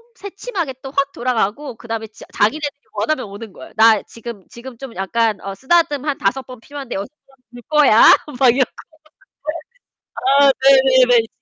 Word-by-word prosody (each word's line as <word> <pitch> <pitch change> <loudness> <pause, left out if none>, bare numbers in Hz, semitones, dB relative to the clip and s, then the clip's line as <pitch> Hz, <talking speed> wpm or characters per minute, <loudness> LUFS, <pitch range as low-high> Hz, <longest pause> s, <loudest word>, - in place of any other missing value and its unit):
새침하게 385 - -6
또 270 - -7
확 275 0 -1
돌아가고 245 +1 -2
그다음에 225 -1 -6
지 215 - -16
자기네들이 290 +7 +1 0.2
원하면 255 +7 -2
오는 205 +2 -10
거예요. - - -13
"나 220 -1 +5
지금 230 -4 -10
지금 240 +1 -12
좀 265 -1 -9
약간 215 +2 -1
어 195 0 -6
쓰다듬 295 - +1
한 290 -2 -2
5 245 +7 -1
번 255 -2 -11
필요한데 275 +1 -8
6 195 +1 -4 0.2
번 270 - -25 0.2
볼 245 0 -12
거야?" 295 -8 +5 0.4
막 260 -3 +5
이러고. 265 -2 +1 1.7
아. 280 -1 +6
네네네. 260 -3 +5
255 Hz, 305 characters per minute, -18 LUFS, 225-275 Hz, 1.7 s, 아